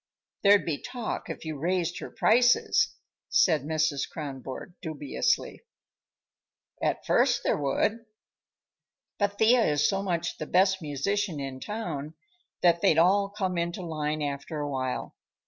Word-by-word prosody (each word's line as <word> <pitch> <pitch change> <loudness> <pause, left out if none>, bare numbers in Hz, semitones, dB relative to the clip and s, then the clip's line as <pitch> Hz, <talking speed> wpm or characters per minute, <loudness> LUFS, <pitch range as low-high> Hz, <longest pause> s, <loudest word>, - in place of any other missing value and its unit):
"There'd 200 0 +5
be 155 -4 -2
talk 245 -3 -5
if - - -6
you 155 -3 -5
raised 175 +1 -1
her - - -7
prices," 245 - +3 0.3
said 160 -5 +4
Mrs. 155 -1 0
Kronborg 135 +1 -7
dubiously. 150 -5 -1 1.2
"At - - -1
first 245 -1 +3
there - - +1
would. 205 +11 0 1.2
But 205 -1 0
Thea 230 +2 +5
is 150 -4 +2
so 195 -1 0
much 175 -3 -2
the 155 - -4
best 190 +1 +3
musician 160 +4 -1
in 135 -1 -5
town 160 -7 -5 0.5
that 170 -1 +4
they'd 160 - +4
all 195 +4 +4
come 190 -4 -2
into 170 +3 -3
line 155 -2 -2
after 145 +2 -4
a 145 - -2
while. 130 -1 -3
170 Hz, 135 wpm, -27 LUFS, 150-200 Hz, 1.2 s, There'd